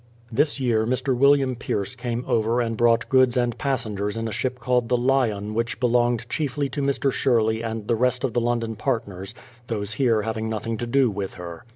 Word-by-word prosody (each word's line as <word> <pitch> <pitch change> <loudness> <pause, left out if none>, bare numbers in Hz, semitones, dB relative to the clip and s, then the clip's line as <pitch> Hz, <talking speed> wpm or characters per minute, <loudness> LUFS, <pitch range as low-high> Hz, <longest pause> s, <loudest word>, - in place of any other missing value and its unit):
This 145 +5 +1
year 115 -4 +1
Mr. 130 +1 0
William 135 0 +4
Pierce 115 -2 -3
came 120 0 -3
over 115 +2 +1
and 115 -2 -1
brought 115 +1 +3
goods 130 -1 +4
and 120 -2 +1
passengers 115 -6 -2
in 115 0 -2
a - - -4
ship 125 +3 -2
called 125 -1 0
the 125 - +3
Lyon 120 -5 +1
which 115 +1 -2
be 125 - +1
longed 120 -1 +2
chiefly 140 +1 -2
to 145 - -3
Mr. 140 0 +1
Sherley 115 -4 +1
and 110 -2 -4
the - - +2
rest 125 +2 +1
of 130 -4 -1
the 120 - +1
London 115 -1 -1
partners, 105 -5 -3 0.3
those 105 -2 -3
here 115 -3 +2
having 110 0 -3
nothing 110 +1 -3
to 120 - -4
do 130 -1 +3
with 100 -1 -5
her. 85 +1 -8
120 Hz, 205 wpm, -24 LUFS, 110-130 Hz, 0.3 s, William